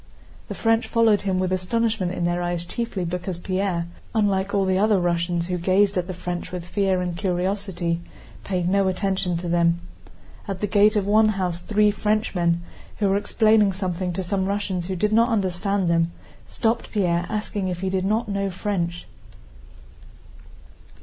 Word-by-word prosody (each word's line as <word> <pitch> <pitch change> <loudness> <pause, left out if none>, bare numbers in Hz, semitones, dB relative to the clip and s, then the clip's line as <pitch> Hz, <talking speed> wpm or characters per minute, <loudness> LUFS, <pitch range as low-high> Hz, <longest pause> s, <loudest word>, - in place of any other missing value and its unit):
The - - -5
French 225 0 +2
followed 225 -3 +3
him 190 -2 0
with 185 0 0
astonishment 200 +1 0
in 180 - -3
their 175 0 0
eyes 175 -1 -2
chiefly 215 -2 -3
because 175 +1 -3
Pierre, 185 -1 -1 0.3
unlike 200 -2 +1
all 200 -1 +2
the 190 0 +2
other 210 -1 +3
Russians 170 0 0
who 180 0 -2
gazed 195 +3 +3
at 180 -1 -1
the 185 - -4
French 180 0 -5
with 180 -2 -5
fear 190 0 +1
and 180 -1 -2
curiosity, 180 -2 -1 0.4
paid 180 -3 -1
no 195 +1 +2
attention 185 -2 0
to 175 +1 -5
them. 170 0 +2 0.7
At 195 -2 -4
the 210 - 0
gate 210 +1 +4
of 205 -2 +1
one 215 +2 +4
house 185 -5 -1
three 210 +2 +2
Frenchmen, 195 -5 0 0.3
who 200 -2 +1
were 195 - +2
explaining 215 -1 +3
something 185 -1 -2
to 190 - -2
some 190 +1 -1
Russians 195 -3 -2
who 190 - -2
did 210 +4 0
not 230 +2 +4
understand 195 -2 0
them, 170 0 +2 0.4
stopped 230 0 -1
Pierre 175 -4 +1
asking 210 -2 -2
if 180 -1 -3
he 190 -1 -1
did 190 -1 0
not 215 +4 0
know 200 -1 -1
French. 175 -3 -3
190 Hz, 170 wpm, -23 LUFS, 175-205 Hz, 0.7 s, gate